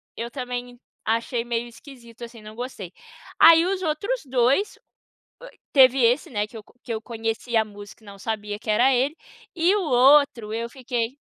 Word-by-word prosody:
eu 235 +1 -6
também 245 -1 -6 0.2
achei 230 +2 -1
meio 240 0 -3
esquisito 235 -2 -14
assim, 230 -1 -10
não 215 0 -12
gostei. 220 -7 -7 0.5
Aí 330 +1 +8
os 380 0 -2
outros 375 +9 -2
dois, 260 - +1 0.9
teve 265 -1 +6
esse 245 +5 +2
né, 210 -3 -1
que 225 - -14
eu 215 - -8 0.2
que 235 - -5
eu 220 - -4
conhecia 225 0 -2
a - - -6
música 205 0 -13
e - - -18
não 200 0 -12
sabia 210 -1 -4
que 215 0 -5
era 245 +5 +4
ele, 270 +5 0 0.4
e 350 +4 +2
o - - 0
outro 265 -4 +4
eu 230 +1 -3
fiquei 250 -2 -4
240 Hz, 175 wpm, -23 LUFS, 225-270 Hz, 0.9 s, Aí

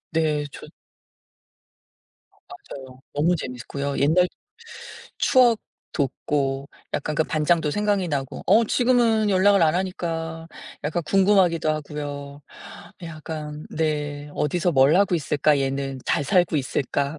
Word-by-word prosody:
네. 155 -2 +1
좋 - - -11 1.6
아 - - -31
맞아요. 130 -2 -11
너무 160 +5 +2
재밌고요. 140 +1 -5
옛날 165 +6 +4 0.9
추억 245 -4 +4 0.3
돋고 135 -1 -2 0.3
약간 155 +1 -2
그 160 - +2
반장도 155 0 +1
생각이 205 -1 0
나고. 135 -3 -3
어 230 +2 +5
지금은 230 -3 +2
연락을 195 0 +4
안 155 0 +3
하니까 165 -3 -3 0.4
약간 160 +3 -1
궁금하기도 185 -4 +3
하고요. 145 -1 -5 0.6
약간 155 -2 -7
네 150 -2 -2
'어디서 175 +3 0
뭘 135 +4 +5
하고 195 -2 +3
있을까 150 -1 +1
얘는. 135 -1 -2
잘 145 - +1
살고 175 +1 +2
있을까.' 140 +2 -2
155 Hz, 245 characters per minute, -23 LUFS, 145-180 Hz, 1.6 s, 어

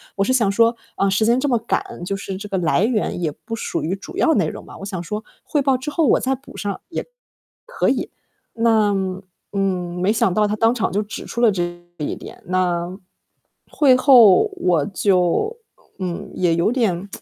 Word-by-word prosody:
我 195 - +1
是 255 - +1
想 225 -6 +3
说， 230 +3 +3 0.2
呃， 195 - +2
时 205 +3 +2
间 235 +3 +3
这 290 - 0
么 240 -4 +2
赶， 220 -5 -3
就 195 +2 -2
是 195 0 -5
这 205 +2 -7
个 195 - -1
来 175 +1 +2
源 215 -5 0
也 160 -3 0
不 225 +9 -7
属 230 - -3
于 175 +5 -1
主 195 - -10
要 320 - +3
内 190 - +2
容 - - -7
嘛。 - - -12
我 - - -9
想 185 -3 -4
说 210 +5 -4 0.2
汇 295 - 0
报 270 -1 +2
之 260 +4 -5
后 315 0 +2
我 - - +4
再 265 - 0
补 270 +1 -10
上 200 -1 -4
也 - - -3
可 - - -29
以。 - - -46 1.5
那 220 -3 +3 0.6
嗯， 185 -3 -1
没 200 +3 +3
想 195 -5 +1
到 210 0 +3
他 205 - -1
当 225 +2 +3
场 225 -6 -1
就 205 - +1
指 210 - -7
出 235 - -5
了 235 - +6
这 185 -3 -1 0.3
一 150 - -3
点。 - - -11
那 180 -1 0 0.8
会 270 -4 +5
后 255 - +6
我 175 - +2
就 195 - +1 0.4
嗯， 180 -2 -4
也 175 -2 +2
有 170 +7 +1
点 200 -7 0
205 Hz, 220 characters per minute, -21 LUFS, 185-235 Hz, 1.5 s, 了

